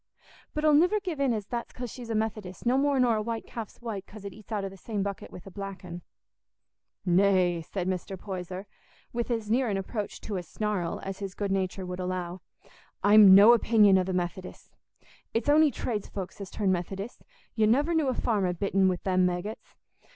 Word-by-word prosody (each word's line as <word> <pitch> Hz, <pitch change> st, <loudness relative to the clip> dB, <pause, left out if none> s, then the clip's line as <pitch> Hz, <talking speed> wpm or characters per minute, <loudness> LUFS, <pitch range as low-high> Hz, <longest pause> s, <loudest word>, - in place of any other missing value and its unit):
But 305 Hz, 0 st, -1 dB
I'll 305 Hz, -, +6 dB
niver 355 Hz, +8 st, +4 dB
give 360 Hz, -7 st, -5 dB
in 275 Hz, -2 st, +2 dB
as 215 Hz, -3 st, -2 dB
that's 235 Hz, +3 st, -4 dB
'cause 245 Hz, -3 st, -6 dB
she's 245 Hz, -3 st, -9 dB
a 225 Hz, -, -1 dB
Methodist, 215 Hz, -4 st, -3 dB
no 245 Hz, +2 st, +3 dB
more 280 Hz, 0 st, +2 dB
nor 240 Hz, -3 st, +3 dB
a -, -, 0 dB
white 230 Hz, +1 st, -4 dB
calf's 225 Hz, -4 st, -8 dB
white 210 Hz, -5 st, -5 dB
'cause 210 Hz, -1 st, -12 dB
it 200 Hz, -, -6 dB
eats 215 Hz, 0 st, -16 dB
out 205 Hz, -2 st, -1 dB
o' -, -, -3 dB
the 195 Hz, -, -12 dB
same 205 Hz, +1 st, -3 dB
bucket 200 Hz, -1 st, -5 dB
wi' -, -, -9 dB
a 195 Hz, -, -10 dB
black 195 Hz, -1 st, -7 dB
un." 175 Hz, 0 st, -7 dB, 1.0 s
"Nay," 180 Hz, -2 st, +3 dB
said 180 Hz, +2 st, -4 dB
Mr. 185 Hz, +1 st, -3 dB
Poyser, 185 Hz, 0 st, -6 dB, 0.5 s
with 235 Hz, +1 st, -2 dB
as 225 Hz, -3 st, -2 dB
near 250 Hz, 0 st, +2 dB
an 200 Hz, -, 0 dB
approach 205 Hz, +2 st, -4 dB
to 205 Hz, -3 st, -4 dB
a -, -, -2 dB
snarl 185 Hz, 0 st, -3 dB
as 195 Hz, 0 st, -5 dB
his 195 Hz, -2 st, -5 dB
good 200 Hz, -2 st, -2 dB
nature 190 Hz, -1 st, -1 dB
would 180 Hz, 0 st, -5 dB
allow; 180 Hz, 0 st, -3 dB, 0.6 s
"I'm 205 Hz, -2 st, +9 dB
no 205 Hz, +4 st, +9 dB
opinion 210 Hz, -4 st, +5 dB
o' -, -, +2 dB
the 190 Hz, -, -3 dB
Methodists. 180 Hz, +1 st, -4 dB, 0.6 s
It's 230 Hz, +4 st, +1 dB
on'y 305 Hz, +1 st, +6 dB
tradesfolks 205 Hz, -6 st, -5 dB
as 195 Hz, -, -6 dB
turn 200 Hz, -3 st, 0 dB
Methodists; 195 Hz, +5 st, -4 dB, 0.3 s
you 215 Hz, -1 st, +3 dB
nuver 285 Hz, +9 st, +3 dB
knew 315 Hz, -3 st, +2 dB
a 255 Hz, -, 0 dB
farmer 200 Hz, -6 st, +1 dB
bitten 195 Hz, +1 st, +2 dB
wi' 180 Hz, -, 0 dB
them 185 Hz, -1 st, +3 dB
maggots. 180 Hz, +5 st, -5 dB
200 Hz, 205 wpm, -28 LUFS, 185-230 Hz, 1.0 s, I'm